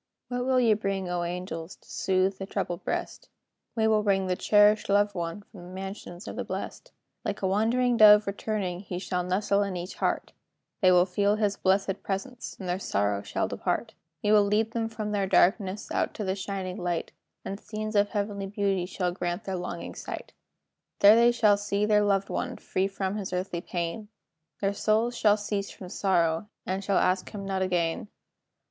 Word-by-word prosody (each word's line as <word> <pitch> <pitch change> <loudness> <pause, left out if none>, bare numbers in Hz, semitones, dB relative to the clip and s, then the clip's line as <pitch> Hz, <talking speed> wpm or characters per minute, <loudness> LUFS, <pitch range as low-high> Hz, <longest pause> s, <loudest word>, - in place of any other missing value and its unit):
What 245 0 -2
will 260 -1 +3
ye 230 -3 +5
bring, 195 -3 -2
O 175 0 -1
angels, 175 -1 -5
To - - -26
soothe 190 0 0
the 195 - -5
troubled 190 -4 -3
breast? - - -4 0.5
"We 220 -1 +2
will 215 -1 +3
bring 195 -2 +2
the 185 -1 0
cherished 210 +2 +4
loved 205 +1 +3
one 170 +2 -4
From 200 -2 -14
the 175 - -11
mansions 190 -1 -7
of - - -6
the - - -3
blest. - - -6 0.3
Like - - -4
a - - +3
wandering 235 +5 +2
dove 210 -1 +8
returning, 200 -3 -2
He 185 -2 -6
shall 180 0 -2
nestle 200 +2 +1
in 200 -3 -2
each 175 +2 -5
heart; - - -1 0.5
They 185 -2 +6
will 180 0 +6
feel 200 +3 +1
his 210 -2 +1
blesséd 195 0 +1
presence, 240 +6 -5
And 190 - -6
their 180 +1 -1
sorrow 100 - 0
shall - - -2
depart. - - -2 0.3
"We 210 - +2
will 210 -1 +7
lead 210 +2 +1
them 225 -1 -2
from 215 -1 -4
their 200 -2 0
darkness 195 +1 +2
Out - - -1
to 215 - -3
the 190 -1 0
shining 190 -2 -4
light, 175 -2 -2 0.3
And 195 +1 -4
scenes 215 0 -5
of 205 0 +4
heavenly 200 -2 -2
beauty 195 -3 0
Shall 180 -1 -1
greet 175 +2 -3
their 190 -2 -3
longing 175 -1 -5
sight. - - -7 0.7
There 230 +4 +8
shall 215 -4 +4
they - - -7
see 205 0 0
their 210 -1 +4
loved 200 -1 +1
one, - - -3
Free 190 +1 -1
from 195 0 -3
his 195 -3 -4
earthly 180 -1 -2
pain; 175 +4 -4 0.5
Their 200 0 +1
souls 220 +4 +1
shall 210 -2 +4
cease 205 -1 -3
from 185 - -10
sorrow, 175 -2 +1 0.2
And 190 +1 -2
shall 195 -1 +1
ask 185 +1 +1
him 200 -2 -7
not 190 -1 -1
again. 175 0 0
195 Hz, 190 wpm, -27 LUFS, 185-210 Hz, 0.7 s, dove